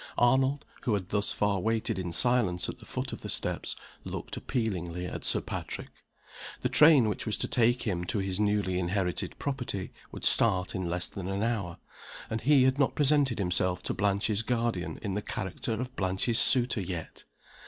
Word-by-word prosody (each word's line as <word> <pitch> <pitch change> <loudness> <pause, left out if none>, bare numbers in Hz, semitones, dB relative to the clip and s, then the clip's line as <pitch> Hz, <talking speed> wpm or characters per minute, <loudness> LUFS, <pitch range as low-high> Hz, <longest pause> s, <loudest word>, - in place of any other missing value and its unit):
Arnold, 130 +3 +3 0.2
who 115 -5 +1
had 95 -2 -4
thus 100 0 0
far 105 -2 +1
waited 110 -1 -1
in 90 -2 -3
silence 100 -2 +3
at - - -6
the - - -14
foot - - -4
of - - -7
the - - -6
steps, - - -1 0.3
looked - - -6
appealingly 90 -7 -3
at 90 - -6
Sir - - +4
Patrick. - - -6 0.7
The - - 0
train 150 -6 +6
which 105 - -3
was 110 - +1
to - - -2
take 120 0 +2
him 90 -5 -1
to 110 - -2
his 95 -1 -1
newly 105 -3 +1
inherited 90 0 -2
property 125 -9 -4 0.2
would - - -6
start 95 -5 +3
in 95 -2 -3
less 90 +1 -1
than 95 -2 -6
an 100 +2 -1
hour; 105 -7 -2 0.5
and 110 0 -2
he 140 -1 +5
had 130 +2 +2
not 140 - +2
presented 145 -4 +3
himself 90 -1 0
to - - -2
Blanche's 100 +1 +1
guardian 115 -5 -1
in 100 -3 -2
the 105 - -1
character 95 +4 -3
of 125 +3 -4
Blanche's 95 +5 +1
suitor 125 -3 +4
yet! 90 -3 -6
105 Hz, 185 wpm, -29 LUFS, 95-120 Hz, 0.7 s, train